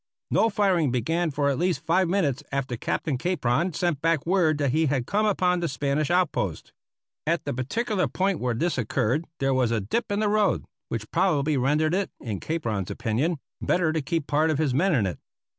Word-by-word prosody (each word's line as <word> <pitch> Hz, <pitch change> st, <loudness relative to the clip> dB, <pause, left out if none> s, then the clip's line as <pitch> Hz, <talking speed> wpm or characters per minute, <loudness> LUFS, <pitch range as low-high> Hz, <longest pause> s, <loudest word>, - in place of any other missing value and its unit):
No 225 Hz, -, +4 dB
firing 190 Hz, -7 st, +2 dB
began 160 Hz, +8 st, 0 dB
for 145 Hz, 0 st, 0 dB
at 135 Hz, -, -2 dB
least 170 Hz, -4 st, 0 dB
five 175 Hz, +2 st, +2 dB
minutes 155 Hz, -8 st, +1 dB
after 135 Hz, -3 st, -2 dB
Captain 130 Hz, +3 st, -2 dB
Capron 170 Hz, -1 st, 0 dB
sent 170 Hz, -3 st, -1 dB
back 165 Hz, -3 st, +1 dB
word 170 Hz, -4 st, +2 dB
that 140 Hz, -3 st, +1 dB
he 160 Hz, +3 st, +2 dB
had 135 Hz, -3 st, 0 dB
come 210 Hz, +7 st, +1 dB
upon 180 Hz, -3 st, +2 dB
the 170 Hz, -, -1 dB
Spanish 140 Hz, +2 st, -1 dB
outpost. 180 Hz, -2 st, 0 dB, 0.5 s
At 165 Hz, +1 st, 0 dB
the 145 Hz, -, -2 dB
particular 195 Hz, -, -1 dB
point 190 Hz, -2 st, 0 dB
where 125 Hz, -1 st, -1 dB
this 165 Hz, +2 st, 0 dB
occurred 125 Hz, +6 st, 0 dB
there 135 Hz, -1 st, +1 dB
was 130 Hz, -3 st, +2 dB
a 115 Hz, -1 st, +1 dB
dip 115 Hz, -, -2 dB
in 205 Hz, -, 0 dB
the 215 Hz, -, +2 dB
road, 210 Hz, -2 st, +2 dB, 0.2 s
which 110 Hz, -2 st, -5 dB
probably 155 Hz, -5 st, +2 dB
rendered 150 Hz, +5 st, +2 dB
it, 195 Hz, +1 st, 0 dB
in 105 Hz, -6 st, -4 dB
Capron's 115 Hz, -, -2 dB
opinion, 140 Hz, +10 st, -1 dB, 0.2 s
better 170 Hz, -3 st, +1 dB
to 160 Hz, -, 0 dB
keep 155 Hz, +2 st, -2 dB
part 155 Hz, +3 st, +2 dB
of 155 Hz, -, +1 dB
his 150 Hz, -4 st, +1 dB
men 170 Hz, +6 st, +2 dB
in 110 Hz, -6 st, +2 dB
it. 90 Hz, -, -4 dB
155 Hz, 200 wpm, -25 LUFS, 130-180 Hz, 0.5 s, No